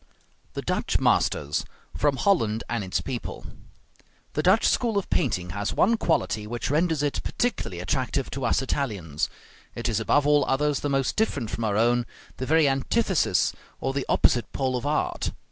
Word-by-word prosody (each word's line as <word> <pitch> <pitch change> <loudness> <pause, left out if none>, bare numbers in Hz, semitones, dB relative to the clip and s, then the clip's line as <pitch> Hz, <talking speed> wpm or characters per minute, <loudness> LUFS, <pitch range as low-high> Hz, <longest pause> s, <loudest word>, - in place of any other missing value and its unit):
THE - - -4
DUTCH - - 0
MASTERS 75 0 +1 0.3
From 145 -2 +2
'Holland 115 - +2
and 115 -2 -2
Its 95 - -1
People' 130 -3 -5 0.9
The 150 - 0
Dutch 190 +7 +4
school 230 -4 +1
of 200 - -2
painting 90 - 0
has 100 +2 -3
one 230 +4 +4
quality 160 - 0
which 120 +3 -3
renders 160 -1 +1
it 145 - -1
particularly 230 - -2
attractive 130 +7 -1
to 135 +1 -4
us 120 +2 +2
Italians; 100 - -2 0.5
it 120 - -2
is 115 -3 0
above 140 +6 +2
all 145 -1 +4
others 145 +2 +1
the 145 - -2
most 135 -1 0
different 140 - 0
from 115 - -2
our 105 -1 0
own, 120 +1 +2 0.3
the 130 - -4
very 160 -1 +4
antithesis 145 - +1 0.3
or 135 - -2
the 135 -1 -2
opposite 120 - +2
pole 130 -2 0
of 125 +3 -2
art. 150 +1 -1
135 Hz, 170 wpm, -26 LUFS, 115-150 Hz, 0.9 s, Dutch